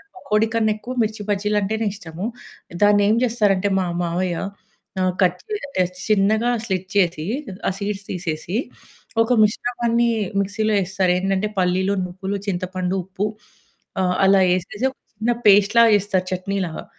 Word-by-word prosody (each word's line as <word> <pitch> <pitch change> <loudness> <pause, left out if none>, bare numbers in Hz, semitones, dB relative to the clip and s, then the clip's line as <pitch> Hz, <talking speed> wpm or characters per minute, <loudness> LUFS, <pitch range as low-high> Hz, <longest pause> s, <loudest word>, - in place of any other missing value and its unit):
పకోడి 215 -11 +1
కన్నెక్కువ 220 +2 0
మిర్చి 215 0 -3
బజ్జీలంటేనే 210 +2 0
ఇష్టము. 175 -1 -7 0.6
దాన్నేం 205 +1 +5
జేస్తారంటే 205 -4 +1
మా 185 - 0 0.2
మావయ్య, 175 0 -1 0.6
ఆహ్, 185 -1 +1
కట్ 180 0 +2
చే 430 - -3 0.3
ఆహ్, 180 - -3 0.2
చిన్నగా 215 +3 +3
స్లిట్ 185 -2 -3
చేసి, 170 -5 +1 0.4
ఆ - - -1
సీడ్స్ 200 -1 -4
తీసేసి, 175 +1 -3 0.6
ఒక 225 +2 +2
మిశ్రమాన్నీ 235 +2 +1 0.3
మిక్సీలో 215 +2 0
యేస్తారేందంటే, 190 +1 0
పల్లీలు, 185 +2 +1
నువ్వులు, 190 +2 -4
చింతపండు, 185 0 -2
ఉప్పు, 195 +2 -3 0.8
ఆహ్, 180 -1 +1
అలా 195 0 +5
యేసేసి 185 +7 -1
ఒక - - -27 0.2
చిన్న 225 +3 0
పేస్ట్‌ 205 +2 +5
లాగ 230 -1 +7
జేస్తారు 190 -2 -1
చట్నీలాగా. 185 -2 -3
195 Hz, 125 wpm, -21 LUFS, 185-215 Hz, 0.8 s, లాగ